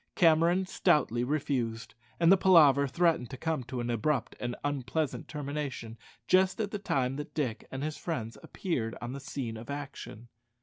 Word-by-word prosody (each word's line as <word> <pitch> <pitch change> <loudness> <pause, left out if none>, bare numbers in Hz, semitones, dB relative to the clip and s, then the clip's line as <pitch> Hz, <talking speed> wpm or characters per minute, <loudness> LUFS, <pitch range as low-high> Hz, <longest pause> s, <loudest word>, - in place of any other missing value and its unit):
Cameron 170 +2 +4
stoutly 150 - +2
refused, 125 -5 -2 0.3
and 165 +1 +5
the - - +9
palaver 150 -7 +6
threatened 160 -3 +1
to 130 - -7
come 160 -2 -2
to 130 0 -5
an 120 0 -2
abrupt 120 +3 0
and 120 0 -3
unpleasant 145 +1 -2
termination 140 -6 -5 0.3
just 185 +2 +3
at 210 -2 -1
the 210 - -3
time 135 -8 0
that 150 +2 -7
Dick 130 -8 -2
and 135 +1 -5
his 155 0 -3
friends 120 -9 -4
appeared 120 - -3
on 120 +1 -5
the 140 - -5
scene 130 -5 -5
of 115 +4 -10
action. 140 -5 -7
140 Hz, 170 wpm, -30 LUFS, 120-160 Hz, 0.3 s, the